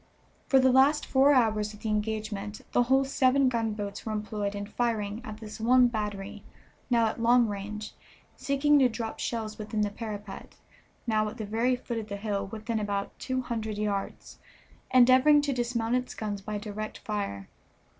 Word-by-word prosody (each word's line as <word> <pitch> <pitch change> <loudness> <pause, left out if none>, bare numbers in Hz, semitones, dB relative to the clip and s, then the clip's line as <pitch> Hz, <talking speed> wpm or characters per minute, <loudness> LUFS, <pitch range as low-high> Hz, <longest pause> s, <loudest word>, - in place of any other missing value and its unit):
For 270 - +4
the 260 0 +5
last 275 +4 +4
four 270 +2 +4
hours 215 -5 +2
of 210 - -17
the 220 - -3
engagement 210 -1 -3
the - - +3
whole 265 +2 +3
seven 265 0 +3
gunboats 215 -4 -3
were 220 - -4
employed 210 -1 -3
in 200 0 -4
firing 215 -1 -2
at 215 -1 -7
this 215 0 -9
one 245 +2 +5
battery, 210 -3 -4 0.5
now 235 -2 +3
at 220 +1 -2
long 240 0 +5
range, 210 +1 -5 0.4
seeking 290 +1 +2
to 260 -2 +5
drop 225 -1 -5
shells 220 -2 -3
within 215 0 -2
the 205 -1 0
parapet, 210 -2 -7 0.5
now 215 -2 +1
at 220 - -10
the 220 - -4
very 230 +5 +1
foot 240 -2 -4
of 215 - -7
the 200 - -4
hill, 200 -1 -2
within 220 +2 -3
about 200 -1 -3
two 260 0 -2
hundred 220 -3 -4
yards, 205 -2 -4 0.5
endeavoring 255 +4 +6
to 285 -1 0
dismount 240 -2 -1
its 250 0 -1
guns 205 -2 -4
by 210 +1 -4
direct 215 +1 -6
fire. 200 - -4
220 Hz, 175 wpm, -28 LUFS, 210-245 Hz, 0.5 s, endeavoring